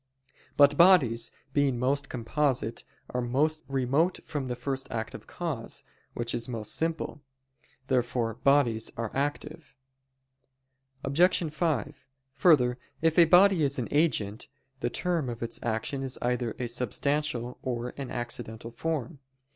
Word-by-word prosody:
But 145 0 +6
bodies, 130 -11 +5 0.2
being 140 -3 +2
most 140 +3 0
composite, 125 -1 -1 0.3
are 125 - -1
most 145 +6 0
remote 135 +6 +1
from 145 -4 -3
the 125 - -2
first 135 +2 -3
active 110 -1 -5
cause, 155 -10 -4 0.3
which 120 0 -2
is 115 +1 -2
most 110 -3 -2
simple. 160 -2 -2 0.6
Therefore 125 -3 0
no 115 - -20
bodies 130 -6 +3
are 115 -2 -3
active. 145 +1 -3 1.3
Obj. 165 +2 +2
5: 150 - -2 0.3
Further, 130 -5 +4 0.2
if 165 +1 +4
a 170 - +9
body 185 +1 +6
is 140 -1 +2
an 125 - -3
agent, 125 -8 +1 0.3
the 120 - -1
term 165 0 -1
of 120 -1 -5
its 115 - -3
action 120 +4 -2
is 135 -1 -3
either 120 -2 -1
a 125 - -2
substantial, 125 +1 -1
or 125 -1 -3
an 140 -2 -6
accidental 120 -1 -5
form. 155 +3 -3
135 Hz, 135 wpm, -28 LUFS, 120-150 Hz, 1.3 s, a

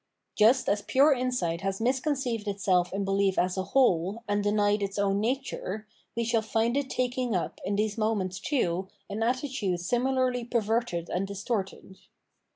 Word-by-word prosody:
* - - -55
Just 230 +5 +4
as 205 0 +1
pure 275 +8 +4
insight 250 -10 -1
has 195 0 -2
misconceived 255 -2 -1
itself 190 -3 +1
in 195 +1 -2
belief 195 0 +1
as 180 0 +1
a 190 -1 -2
whole 210 -4 +2
and 205 0 0
denied 205 0 +2
its 195 0 -3
own 200 0 +1
nature, 220 -3 -3 0.3
we 235 - 0
shall 230 0 +1
find 225 +2 0
it 280 -1 -1
taking 250 -3 -1
up 180 - -3
in 200 - 0
these 210 +1 -1
moments, 200 -4 0
too, 190 - 0 0.2
an 210 +2 -3
attitude 245 -6 -1
similarly 250 +5 0
perverted 225 -6 -1
and 190 +2 -2
distorted. 200 -2 -4
215 Hz, 165 wpm, -28 LUFS, 195-245 Hz, 0.3 s, Just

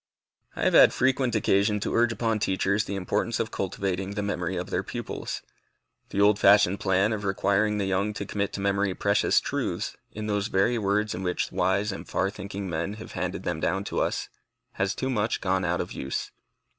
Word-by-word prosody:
I - - -3
have - - +3
had - - +8
frequent 130 -2 +1
occasion 105 0 +2
to - - -2
urge 120 0 +3
upon 115 -1 0
teachers 100 +1 +1
the 100 - -4
importance 95 -2 -1
of - - -2
cultivating 95 +1 -2
the 105 - -1
memory 95 -2 -2
of 90 +2 -4
their - - +1
pupils. - - -5 0.7
The 100 - -3
old 105 0 +5
fashioned 100 -1 +5
plan 95 +3 +2
of 105 -1 -4
requiring 100 +2 +1
the 100 - 0
young 95 +2 0
to - - -4
commit 100 -1 -2
to - - -4
memory 100 -1 +1
precious 100 0 +3
truths, - - -3 0.2
in 110 0 -6
those 105 -1 0
very 115 +4 +2
words 105 +1 +1
in 90 - -5
which 90 -1 -1
wise 100 +3 +1
and 95 - -8
far 95 +1 0
thinking 100 -1 -6
men 85 +3 -2
have 110 +1 -9
handed - - -3
them 90 -3 -2
down 95 +4 0
to - - -3
us, - - -1 0.4
has 95 +3 -1
too 130 0 -2
much 110 -2 0
gone 95 0 0
out 90 0 0
of - - -6
use. 65 - -4
100 Hz, 200 wpm, -27 LUFS, 95-105 Hz, 0.7 s, had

